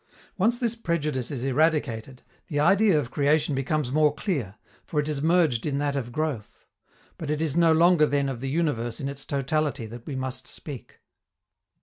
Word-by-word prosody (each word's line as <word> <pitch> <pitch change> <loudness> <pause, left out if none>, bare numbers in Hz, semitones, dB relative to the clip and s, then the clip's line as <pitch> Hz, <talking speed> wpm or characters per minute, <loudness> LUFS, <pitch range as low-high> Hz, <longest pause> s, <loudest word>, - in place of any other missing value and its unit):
Once 225 +5 +2
this 235 -2 -1
prejudice 150 - -2
is 130 -4 -4
eradicated, 135 -4 0 0.2
the 145 - -2
idea 195 +3 +4
of 130 -3 -4
creation 150 +1 +2
becomes 135 0 -1
more 150 +1 +4
clear, 135 - -3 0.3
for 150 - -2
it 145 - -1
is 150 -2 -2
merged 160 -7 +3
in 145 -2 -1
that 145 0 -1
of 120 -3 -3
growth. 145 -6 -4 0.5
But 155 - -5
it 150 0 0
is 155 -3 -1
no 170 -1 +5
longer 165 -1 +5
then 140 -1 +1
of 130 -3 -4
the 135 - -2
universe 135 -7 -1
in 135 - -3
its 140 0 -6
totality 140 -1 -1
that 115 +2 -10
we 140 - -4
must 130 0 -4
speak. 140 -6 -8
145 Hz, 185 wpm, -26 LUFS, 130-160 Hz, 0.5 s, no